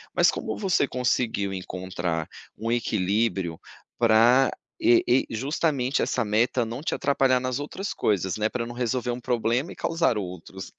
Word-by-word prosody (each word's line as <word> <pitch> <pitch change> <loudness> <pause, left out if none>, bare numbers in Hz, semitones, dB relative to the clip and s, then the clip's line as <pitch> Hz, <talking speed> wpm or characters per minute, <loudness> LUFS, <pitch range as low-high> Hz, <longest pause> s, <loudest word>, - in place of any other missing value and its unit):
Mas - - +5
como - - -4
você 185 -8 +1
conseguiu 115 -5 0
encontrar 90 -3 -3 0.3
um 115 +1 -2
equilíbrio 100 -5 0 0.4
pra 120 +3 +5 0.3
e 120 - +5
e 125 +2 +3
justamente 135 +2 0
essa 115 - 0
meta 115 +3 +1
não 120 +5 -6
te - - -1
atrapalhar 135 -2 +2
nas 130 +1 -2
outras 190 +7 -4
coisas, 95 -3 0
né, 110 +1 +1
pra 120 -2 -3
não 120 - -7
resolver 125 0 -1
um 120 +1 -5
problema 120 +5 0
e - - -9
causar 165 -9 +1
outros? 95 0 -7
120 Hz, 155 wpm, -25 LUFS, 105-130 Hz, 0.4 s, Mas